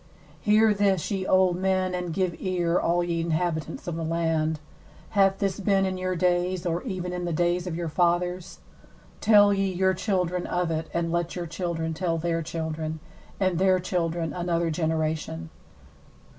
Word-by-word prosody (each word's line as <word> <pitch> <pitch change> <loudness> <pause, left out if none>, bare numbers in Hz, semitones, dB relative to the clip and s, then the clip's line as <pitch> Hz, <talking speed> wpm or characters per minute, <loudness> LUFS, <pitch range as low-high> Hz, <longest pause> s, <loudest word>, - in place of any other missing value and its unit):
2Hear 215 0 +5
this, 195 -4 +1
ye 190 -2 -2
old 185 -2 +4
men, 185 0 +1
and 180 -1 -3
give 185 -1 0
ear, 175 -2 +1
all 175 +1 +2
ye 170 -1 -1
inhabitants 165 -2 -2
of 170 - -2
the 165 - -3
land. 160 -1 0 0.5
Hath 195 -2 +3
this 195 -1 -1
been 195 0 +2
in 190 0 -1
your 185 0 -1
days, 180 +1 +1
or 170 0 0
even 180 -5 -4
in 180 0 -3
the 170 - -2
days 175 +2 0
of 170 - -3
your 170 0 -3
fathers? 175 +2 0 0.6
3Tell 205 -2 +6
ye 195 -1 0
your 190 +1 +2
children 180 -2 -1
of 175 -1 -1
it, 160 0 -2
and 170 -1 -1
let 170 0 -1
your 175 -1 -3
children 165 -1 -3
tell 165 0 -1
their 165 0 -1
children, 160 -1 -4 0.4
and 185 -3 +1
their 185 -1 +4
children 170 -3 -1
another 170 0 0
generation. 155 - -2
175 Hz, 170 wpm, -26 LUFS, 165-185 Hz, 0.6 s, 3Tell